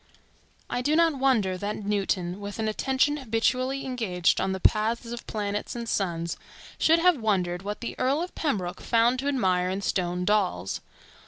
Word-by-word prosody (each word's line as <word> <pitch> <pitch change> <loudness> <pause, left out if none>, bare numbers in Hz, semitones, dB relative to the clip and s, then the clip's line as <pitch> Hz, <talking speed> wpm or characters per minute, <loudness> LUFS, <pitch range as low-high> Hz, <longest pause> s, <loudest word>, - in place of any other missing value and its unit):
I 245 - -2
do 295 +4 +2
not 325 -4 +3
wonder 215 -9 +2
that 205 +2 -2
Newton, 195 -3 -1
with 205 0 -6
an 220 -1 -1
attention 265 +6 +1
habitually 255 +2 0
engaged 220 -9 +1
on 190 - 0
the 190 - -3
paths 220 +4 +2
of 240 -1 -7
planets 205 0 -3
and 235 -1 -5
suns, 170 -5 -1 0.4
should 325 +1 +5
have 340 -5 +3
wondered 180 -5 0
what 205 +2 -5
the 235 - -4
Earl 275 +6 +1
of 360 - -7
Pembroke 190 - -2
found 235 +2 +3
to 275 - -2
admire 185 -10 +1
in 190 +2 -2
"stone 180 -2 -1
dolls." 205 - 0
215 Hz, 170 wpm, -27 LUFS, 190-255 Hz, 0.4 s, should